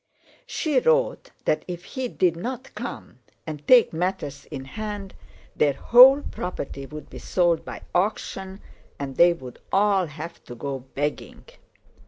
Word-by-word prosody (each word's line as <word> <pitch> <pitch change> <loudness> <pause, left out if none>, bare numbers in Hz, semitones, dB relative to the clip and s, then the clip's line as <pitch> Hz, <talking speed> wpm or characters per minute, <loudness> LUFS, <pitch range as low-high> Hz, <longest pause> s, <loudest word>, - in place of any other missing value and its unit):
She 300 - +1
wrote 485 +1 +1 0.2
that 155 - +1
if 175 -1 -6
he 260 -2 -4
did 180 -7 +1
not 255 +9 -6
come - - -7 0.3
and 150 -2 -7
take 245 -7 +6
matters 165 -5 -3
in 135 -3 -7
hand, 205 +4 -6 0.4
their 145 -2 +3
whole 260 - +7
property 140 -6 -5
would 150 0 -9
be - - -8
sold 175 -3 +1
by - - -8
auction 190 0 -2 0.4
and 135 -2 -5
they 175 0 +7
would 130 -8 -8
all 195 -2 +3
have 155 +3 -9
to 120 - -9
go 135 +2 -4
begging. 140 +3 -4
175 Hz, 145 wpm, -25 LUFS, 145-210 Hz, 0.4 s, whole